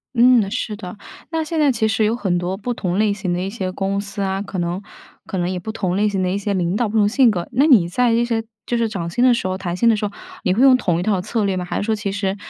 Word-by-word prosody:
嗯， 240 -4 +5
是 225 -2 -3
的， 195 -2 -9 0.3
那 325 0 -1
现 320 +1 -4
在 295 -3 +4
其 220 -2 0
实 220 0 +1
有 215 +2 +2
很 190 -5 0
多 180 +2 -2
不 245 +4 -3
同 185 -2 -2
类 215 -1 +2
型 195 -3 -3
的 175 - -1
一 190 - -2
些 190 -4 -4
公 195 +1 -2
司 200 0 -6
啊， 195 0 -1
可 200 -2 -5
能 175 +2 -2 0.4
可 190 - -5
能 175 0 0
也 185 - -2
不 220 +5 -5
同 185 -4 -2
类 210 +1 +2
型 195 -2 -1
的 185 - 0
一 190 - -1
些 200 0 -2
领 180 -1 0
导， 230 0 0
不 220 - -1
同 205 -1 +4
性 245 +1 +4
格， 175 -4 -3
那 265 +5 +4
你 230 - +5
在 240 +6 +1
这 235 +1 +2
些 230 -2 -1 0.2
就 240 - -1
是 230 -1 0
涨 170 -5 -4
薪 240 +8 0
的 255 -1 +6
时 210 -5 -1
候、 185 0 -2
谈 180 -2 -4
薪 235 - +2
的 225 - +5
时 210 - -2
候， 200 - -3 0.3
你 185 - +2
会 225 - +1
用 265 -1 +7
同 175 -9 0
一 - - -2
套 195 -2 +1
策 215 +1 -1
略 195 - 0
吗？ 180 - -2
还 175 - -4
是 - - -1
说 220 0 0
其 205 -2 -3
实 195 -1 -2
205 Hz, 335 characters per minute, -20 LUFS, 185-230 Hz, 0.4 s, 用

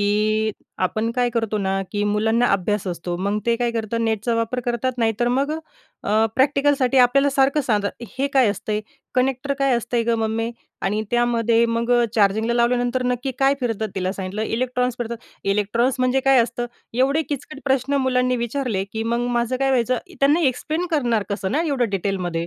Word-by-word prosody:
की 215 +1 +1 0.3
आपण 220 +5 -1
काय 245 -1 +1
करतो 225 -2 -1
ना, 195 0 0
की 205 0 -1
मुलांना 220 +3 +2
अभ्यास 200 +1 0
असतो. 175 -1 -3
मग 200 +3 -1
ते 235 - +3
काय 240 -1 0
करतात 230 0 -2
नेटचा 225 +1 0
वापर 230 +2 -1
करतात 245 +1 -1
नाही 225 -1 +2
तर 240 - +3
मग 275 +4 +1
अ, 310 - -1 0.5
अ, 220 +2 +3
प्रॅक्टिकलसाठी 275 -1 +3
आपल्याला 275 +3 +4
सारखं 275 +2 +3
सांगतात 215 -1 -1
हे 275 - +2
काय 255 -5 +5
असतंय? 210 +1 -2 0.3
"कनेक्टर 265 +2 0
काय 275 -1 +2
असतंय 235 +1 -1
गं 230 -1 +1
मम्मी? 225 +1 -1 0.3
आणि 210 +3 0
त्यामध्ये 235 -1 +2
मग 230 +1 -1 0.2
चार्जिंगला 220 +3 +2
लावल्यानंतर 245 +1 +1
नक्की 250 +2 -1
काय 270 +1 +4
फिरतात?" 220 -3 -1
तिला 185 0 -1
सांगितलं 195 +2 -4
इलेक्ट्रॉन्स 250 -1 -1
फिरतात. 235 -1 -3 0.3
"इलेक्ट्रॉन्स 210 +6 +1
म्हणजे 255 +1 +2
काय 270 -1 +4
असतं?" 240 +1 -3 0.3
एवढे 280 +5 +3
किचकट 290 0 -5
प्रश्न 270 0 +1
मुलांनी 250 0 +2
विचारले 235 -4 -2
की 220 0 -2
मग 235 +1 -1
माझं 240 +2 0
काय 270 +1 +1
व्हायचं 250 -1 +2 0.2
त्यांना 290 +5 +4
एक्सप्लेन 310 +5 0
करणार 240 -8 +1
कसं 200 -1 -2
ना, 310 +5 +1
एवढं 260 -6 +1
डिटेलमध्ये 180 -3 -2
235 Hz, 175 wpm, -22 LUFS, 215-255 Hz, 0.5 s, काय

